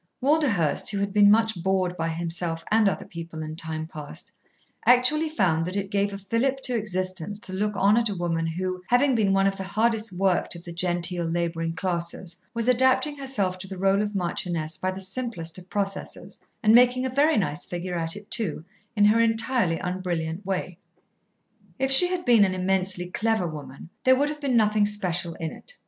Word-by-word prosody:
Walderhurst, 260 - +1
who 200 - 0
had 200 0 -2
been 205 -1 +6
much 220 -3 +2
bored 185 -1 0
by 165 -1 -2
himself 165 0 -3
and 215 -2 +4
other 165 - -5
people 165 -2 -8
in 155 0 -6
time 160 -1 -4
past, 150 -2 -10 0.5
actually 255 +6 +4
found 180 - +1
that 180 - -4
it 195 0 -4
gave 200 0 0
a 200 - -6
fillip 230 +7 -1
to 255 -2 -2
existence 185 -3 -3
to 185 - -2
look 210 +2 -1
on 200 +3 +3
at 235 -2 +2
a 200 - -3
woman 165 -2 -2
who, 185 +2 -3
having 260 +3 +3
been 215 -5 +2
one 195 0 +3
of 195 0 0
the 190 - -4
hardest 220 +2 0
worked 185 -1 0
of 170 - -10
the 175 - -9
genteel 175 0 0
labouring 165 0 -2
classes, 170 -1 -4 0.2
was 230 0 -3
adapting 260 +4 +3
herself 205 -10 -1
to 190 - -7
the 190 -1 -8
role 195 +2 +2
of 210 -1 -3
marchioness 170 -3 -2
by 185 - -2
the 185 0 -5
simplest 190 -5 -2
of 180 0 -16
processes, 195 -1 -4 0.2
and 215 0 +5
making 250 +2 +5
a - - -1
very 285 +2 +2
nice 180 -7 -1
figure 175 0 -5
at 165 -1 -2
it 205 0 -12
too, 220 -8 -1 0.3
in 205 -1 +4
her 215 +2 +4
entirely 230 -5 +1
unbrilliant 180 -1 -3
way. 185 -2 -4 1.0
If 265 0 0
she 310 +7 +10
had 360 -1 -3
been 235 -4 +5
an 185 -1 +1
immensely 185 -1 0
clever 220 -2 0
woman, 150 0 -8
there 260 0 +5
would 285 +3 +1
have 300 0 -7
been 265 -4 +1
nothing 210 -1 +3
special 180 -5 0
in 160 -1 -5
it. - - -8
195 Hz, 195 wpm, -25 LUFS, 175-225 Hz, 1.0 s, she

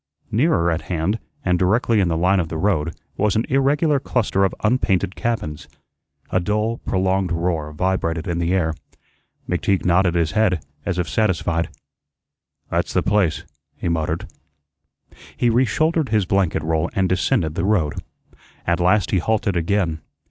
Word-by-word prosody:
Nearer 110 - +2
at 80 - -1
hand, 90 +5 0 0.3
and 90 -1 +2
directly 110 +4 +2
in 95 - +3
the 80 -1 0
line 90 +3 +3
of 80 -3 -1
the 80 - -4
road, 85 -3 0 0.2
was 105 -1 +1
an 110 - +1
irregular 140 +2 +2
cluster 110 -7 0
of 95 - +1
unpainted 105 -5 +1
cabins. 95 -11 -3 0.6
A 95 - +2
dull, 105 +5 -1
prolonged 95 -1 0
roar 85 -3 -1
vibrated 85 0 -1
in 85 -1 -1
the 85 0 0
air. 85 -4 +1 0.7
McTeague 95 -2 0
nodded 90 0 +3
his 85 -2 +1
head 100 -8 +1 0.2
as 90 -2 -1
if 90 -2 -1
satisfied. 85 -3 0 1.0
"That's - - -1
the - - +2
place," 95 -7 +1 0.3
he - - -2
muttered. 80 -1 -1 1.1
He 120 - +2
reshouldered 145 +6 +2
his 105 -3 +2
blanket 95 -2 +1
roll 80 +1 0
and 95 -1 +2
descended 90 -3 +1
the 85 - -2
road. 95 -7 +1 0.7
At 85 0 +1
last 90 +1 +2
he 95 - +3
halted 105 0 0
again. 85 -2 0
95 Hz, 155 wpm, -21 LUFS, 85-105 Hz, 1.1 s, in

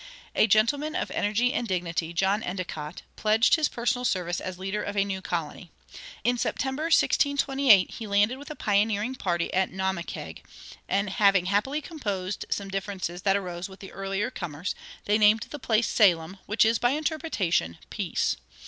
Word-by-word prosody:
A - - +4
gentleman 280 +9 +2
of - - -2
energy 230 +5 +1
and 245 -6 -1
dignity, 170 -3 -2
John 195 +5 +1
Endicott, 175 -5 -5
pledged 220 +2 +3
his 315 -2 +4
personal 245 +1 -1
service 180 -6 -1
as 185 -1 -5
leader 195 +3 -3
of 205 0 -4
a 200 - +3
new 190 -1 -4
colony. 170 -1 -4 0.5
In 245 +2 +1
September, 270 +6 -1
1628, 275 - +4
he 225 - -7
landed 205 +6 +2
with 285 - -10
a 305 - -6
pioneering 210 +2 +1
party 175 -8 -2
at 190 0 +2
Naumkeag, 190 -2 -4 0.5
and 200 +1 +1
having 195 -2 +4
happily 210 +11 0
composed 205 - -4
some 200 -1 -2
differences 190 -2 -4
that 195 +1 +3
arose 180 -1 -5
with 190 - -13
the 195 - -10
earlier 195 +4 -2
comers, 175 - -4 0.3
they 210 +1 +2
named 215 +1 +5
the 295 - -6
place 225 -2 +1
Salem, 185 -3 +3
which 210 +1 +3
is, 225 0 +2
by 245 - +3
interpretation, 290 - -1
"Peace." - - -1
200 Hz, 165 wpm, -27 LUFS, 185-235 Hz, 0.5 s, named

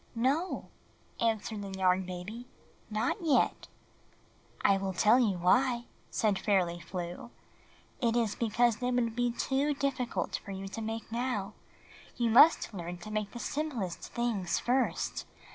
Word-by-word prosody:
"No," 275 +10 0 0.5
answered 220 -2 0
the 195 -1 -6
Yarn 185 0 +2
Baby, 195 +7 -7 0.4
"not 215 - 0
yet." 310 -6 +2 1.0
"I 195 0 +4
wiU 190 -2 -3
tell 215 +4 +6
you 210 -7 +2
why," 240 +7 +3 0.2
said 210 -3 +1
Fairly 180 -4 +1
Flew. 175 +4 -6 0.7
"It 235 -2 +2
is 230 -4 +2
because 235 0 +2
they 245 +2 -1
would 240 -2 0
be 245 0 +1
too 275 +4 0
difficult 265 -3 -1
for - - -11
you 195 0 -5
to 210 +3 -6
make 225 0 -5
now. 230 -4 -2 0.6
You 235 -2 +1
must 275 0 +6
learn 175 -2 -5
to 195 +5 -9
make 215 -1 -1
the - - -9
simplest 240 - -3
things 230 -7 -1
first. 255 +2 0
225 Hz, 145 wpm, -31 LUFS, 195-245 Hz, 1.0 s, tell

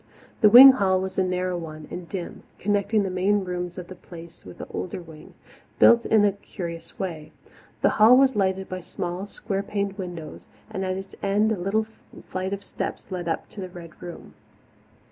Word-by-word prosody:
The 210 - +6
wing 255 +5 +11
hall 190 -7 +1
was 190 0 -3
a - - +3
narrow 180 -1 -1
one 155 -2 -9
and 175 -1 -7
dim, 185 -3 -6 0.2
connecting 205 +1 +1
the 190 - -3
main 195 +2 +1
rooms 180 -1 -5
of 180 -2 -7
the - - -9
Place 170 -2 -13
with - - -12
an - - -6
older 185 - -4
wing, 160 -3 -13 0.4
built 235 0 +6
in 215 -2 +4
a 205 - +4
curious 170 -4 -8
way. 160 -5 -5 0.5
The - - +6
hall 235 +4 +8
was 265 -1 +4
lighted 190 -1 0
by 185 0 -6
small, 180 +2 -5
square 195 -1 -4
paned 200 0 -3
windows, 175 -4 -7 0.2
and 190 - -3
at 185 0 -2
its 195 0 -8
end 205 +2 +2
a - - +1
little 200 +4 0 0.4
flight 185 +1 -3
of 200 0 -4
steps - - -6
led 180 -2 -4
up 165 - -2
to 205 - -9
the 185 - -6
Red 175 -2 -12
Room. 175 -1 -9
185 Hz, 195 wpm, -24 LUFS, 175-200 Hz, 0.5 s, wing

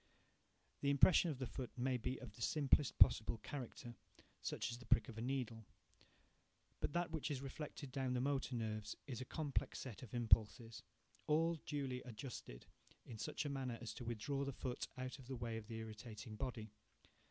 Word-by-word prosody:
The 140 - +2
impression 155 +5 +7
on 145 - -2
the 130 - -2
foot 120 +3 -4
may 130 +1 +2
be 125 +3 -2
of 120 -5 -8
the - - -12
simplest 145 +1 +3
possible 110 +1 +7
character—such 120 -4 -5
as 120 - -5
the 125 - -12
prick 110 - +5
of 115 -1 -6
a - - -2
needle—but 120 +1 -6
that 175 -1 +1
which 160 -2 -1
is 140 -2 -2
reflected 140 0 -5
down 130 -2 0
the - - +2
motor 135 -1 +1
nerves 110 -2 -2
is 130 -4 -4
a - - -3
complex 145 +1 -1
set 125 -6 -6
of 125 -2 -7
impulses, 115 -1 +3 0.5
all 165 +2 +4
duly 135 -4 -1
adjusted, 115 - -7 0.4
in 110 -3 -8
such 115 - -2
a - - 0
manner 130 -4 -2
as 115 -2 -5
to - - -7
withdraw 120 +5 -1
the 140 - -1
foot 125 0 -3
out 130 +1 -4
of 130 - -12
the 130 - -3
way 115 -2 -2
of 110 -1 -5
the 115 - -5
irritating 110 0 -7
body. 110 -3 -3
125 Hz, 180 wpm, -41 LUFS, 115-140 Hz, 0.5 s, impression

